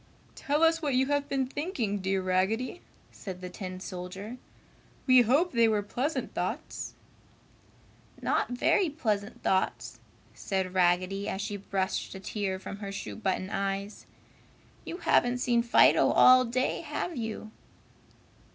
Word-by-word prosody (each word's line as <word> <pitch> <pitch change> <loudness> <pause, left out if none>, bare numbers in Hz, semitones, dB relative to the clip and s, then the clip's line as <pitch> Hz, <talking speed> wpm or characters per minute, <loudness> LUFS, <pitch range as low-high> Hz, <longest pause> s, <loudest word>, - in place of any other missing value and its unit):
"Tell 295 +2 0
us 325 0 +4
what 285 -4 0
you 260 +1 +3
have 285 -1 0
been 270 -1 0
thinking, 255 - -2
dear 190 0 -1
Raggedy," 195 - 0 0.3
said 185 -3 -8
the 180 0 -7
tin 185 -1 -6
soldier. 190 +5 -7 0.7
"We 255 -2 +7
hope 280 +10 +3
they 235 -2 +4
were 210 -2 +1
pleasant 265 +9 -3
thoughts." - - -4 1.2
"Not - - 0
very 310 +9 +2
pleasant 215 -9 -3
thoughts!" 190 0 0 0.3
said 190 -2 -2
Raggedy, 185 +2 +1
as 190 - -3
she 205 0 -3
brushed 195 -1 -2
a - - -7
tear 195 0 -3
from 195 +1 -8
her 200 -1 -6
shoe 195 - -6
button 190 -2 -2
eyes. 195 +1 -3 0.8
"You 345 - -5
haven't 245 -8 +2
seen 240 -1 +2
Fido 235 0 +5
all 255 0 +7
day, 255 +2 -1
have 350 - -4
you?" 220 -2 -5
215 Hz, 140 wpm, -29 LUFS, 190-255 Hz, 1.2 s, We